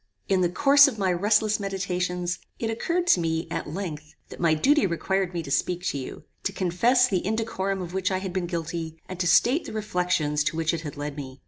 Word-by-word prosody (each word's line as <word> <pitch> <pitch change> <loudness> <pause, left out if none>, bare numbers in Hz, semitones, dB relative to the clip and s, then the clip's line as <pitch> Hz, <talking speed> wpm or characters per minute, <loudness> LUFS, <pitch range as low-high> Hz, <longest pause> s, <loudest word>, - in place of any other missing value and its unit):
"In 190 -1 +2
the 175 - +2
course 280 - +6
of 255 -6 -3
my 190 -3 +1
restless 210 +4 +2
meditations, 180 -2 -2 0.2
it 225 -1 -2
occurred 340 +10 -1
to 345 - +4
me, 160 0 -1
at - - -3
length, 155 -3 -6
that - - -10
my 165 -2 +3
duty 270 - +3
required 190 +2 -1
me 170 -2 -3
to 140 - -8
speak 180 +4 0
to - - -3
you, 130 - -8 0.2
to 195 - -1
confess 215 +8 +3
the 190 -6 -1
indecorum 195 -3 -2
of 175 0 -8
which 190 -1 0
I 190 - 0
had 190 -1 -5
been 180 -2 -1
guilty, 165 -1 -4
and 185 -1 -7
to 175 - +1
state 255 - +4
the - - -7
reflections 180 -8 0
to 160 - -1
which 165 0 +1
it 165 - -3
had 150 -3 -7
led 145 0 -4
me. 130 -2 -8
180 Hz, 225 wpm, -25 LUFS, 165-205 Hz, 0.2 s, course